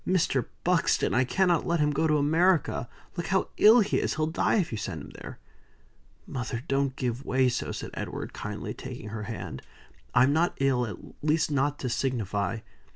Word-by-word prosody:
"Mr. 165 -8 +2 0.2
Buxton, 180 -1 +2
I 125 - +4
cannot 180 +5 +2
let 170 -1 +1
him 150 0 +3
go 155 +3 +1
to 150 -1 +3
America. 160 -3 +2 0.3
Look 175 - -3
how 190 +1 +1
ill 225 +3 +8
he 205 - +1
is. - - -1
He'll 155 0 +1
die 160 +2 +1
if 190 -7 +1
you 110 - -3
send - - -5
him - - -10
there." - - -9 0.9
"Mother, 125 -2 -4
don't 135 -1 0
give 125 0 -2
way 130 -1 +2
so," 120 - -2
said - - -6
Edward, - - -5
kindly, - - -5
taking 105 - -8
her 105 0 -5
hand. 105 - -6 0.5
"I'm 130 +3 +5
not 170 +3 +1
ill, 130 -3 +2
at 105 - -6 0.3
least 155 0 +2
not 145 +1 +1
to 130 - -2
signify. 115 -4 -1
140 Hz, 185 wpm, -28 LUFS, 125-165 Hz, 0.9 s, ill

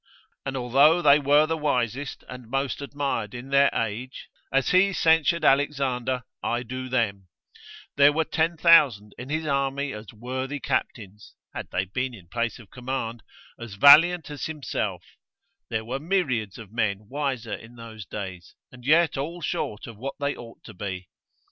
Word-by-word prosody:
And 135 0 -3
although 140 +7 +4
they 145 0 +7
were 145 +2 +4
the 165 +1 -1
wisest, 135 -2 -2
and 125 -2 -10
most 135 +2 -2
admired 140 -6 -3
in 120 +2 -8
their 140 0 +5
age, 115 +4 -4 0.2
as 135 -1 +2
he 195 +2 +4
censured 165 0 +3
Alexander, 130 -3 +1 0.2
I 120 +1 -1
do 130 +2 -6
them, 100 -7 -1 0.7
there 140 +1 +7
were 160 +2 +1
10,000 160 -11 +3
in 125 +2 -8
his 160 +1 -2
army 140 -1 -1
as 105 -2 -9
worthy 130 +5 -5
captains 105 -5 -4 0.2
(had - - -6
they 95 - -1
been 125 +6 -3
in 90 -5 -16
place 115 +2 -2
of 115 -5 -16
command) 125 -2 -4 0.4
as 115 -4 -8
valiant 160 - +7
as 145 - -4
himself; 110 - -3 0.7
there 110 -1 -2
were 130 +4 -3
myriads 135 - -1
of 110 -4 -11
men 105 -3 -1
wiser 130 -4 -3
in 115 +2 -9
those 115 -2 -9
days, 95 -2 -8 0.2
and 125 -1 -14
yet 155 +1 +3
all 165 +5 -4
short 105 -9 -3
of 115 -3 -10
what 135 +5 -5
they 140 0 -1
ought 115 -1 -12
to 110 - -11
be. 95 -2 -6
130 Hz, 160 wpm, -25 LUFS, 115-145 Hz, 0.7 s, they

